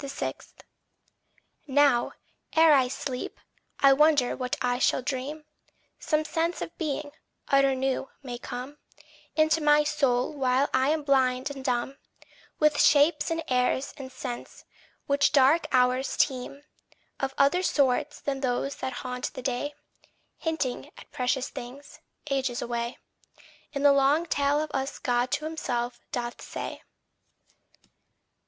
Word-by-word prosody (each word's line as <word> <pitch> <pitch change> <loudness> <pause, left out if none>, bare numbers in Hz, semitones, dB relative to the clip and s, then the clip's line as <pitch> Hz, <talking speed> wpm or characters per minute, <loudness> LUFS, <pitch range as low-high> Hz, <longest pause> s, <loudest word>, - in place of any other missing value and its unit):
6. 275 0 -5 1.1
Now, 280 -3 +3 0.4
ere 320 -1 +7
I 265 -3 +4
sleep, 255 0 -5 0.4
I 275 -1 +7
wonder 290 -3 +3
what 255 -1 -2
I 245 0 0
shall 260 - +2
dream. 285 +3 -4 0.5
Some 310 -1 0
sense 330 +2 -1
of - - -6
being, 295 -2 -3 0.4
utter 275 -1 +4
new, 265 +1 -1
may 245 -2 -6
come 250 +5 -7 0.6
Into 315 +1 +3
my 295 0 +5
soul 275 -3 +1
while 265 -1 +1
I 260 +1 +3
am 310 0 0
blind 260 -1 +2
and 270 -2 -8
dumb 255 +1 -1 0.6
With 300 -1 +3
shapes 295 +2 +4
and 330 0 -2
airs 255 +2 +1
and 270 -3 -9
scents 245 -2 -7 0.4
which 280 0 +2
dark 285 +4 +4
hours 255 +1 +2
teem, 275 +1 -1 0.6
Of 270 0 -2
other 280 +6 +4
sort 290 -3 +1
than 275 -1 -1
those 265 +1 -1
that 260 0 -4
haunt 250 0 -3
the 255 - -7
day, 270 +3 -2 0.6
Hinting 320 -6 -2
at - - -14
precious 255 +1 -1
things, 265 +2 -10 0.3
ages 260 -3 0
away 235 0 -3 0.7
In 280 -1 -3
the 285 -1 +7
long 280 +4 +3
tale 290 -2 +1
of 310 - -7
us 270 +1 -2
God 245 -1 0
to 295 +1 -1
himself 245 -6 -3
doth 240 -1 -4
say. - - -6
275 Hz, 135 wpm, -27 LUFS, 255-295 Hz, 1.1 s, ere